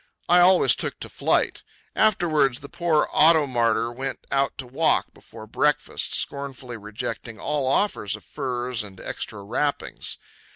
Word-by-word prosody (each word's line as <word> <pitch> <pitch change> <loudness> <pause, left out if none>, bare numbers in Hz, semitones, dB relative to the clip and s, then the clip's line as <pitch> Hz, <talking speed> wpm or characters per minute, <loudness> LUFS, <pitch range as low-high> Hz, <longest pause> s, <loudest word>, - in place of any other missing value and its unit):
I 175 +1 +6
always 180 +1 +6
took - - -4
to - - -4
flight. - - 0 0.3
Afterwards 155 - +2
the 140 - -10
poor 160 0 +1
auto 160 -1 +6
martyr 115 -3 +1
went 130 +2 -4
out 135 0 +1
to 135 - -5
walk 140 +6 +1
before 110 -1 -12
breakfast, 150 +6 0
scornfully 135 -3 -3
rejecting 110 +1 -6
all 145 -3 -1
offers 135 - 0
of 105 - -12
furs 125 -2 -3
and 100 -3 -10
extra 100 -2 -5
wrappings. 140 +8 -2
135 Hz, 140 wpm, -24 LUFS, 115-150 Hz, 0.3 s, I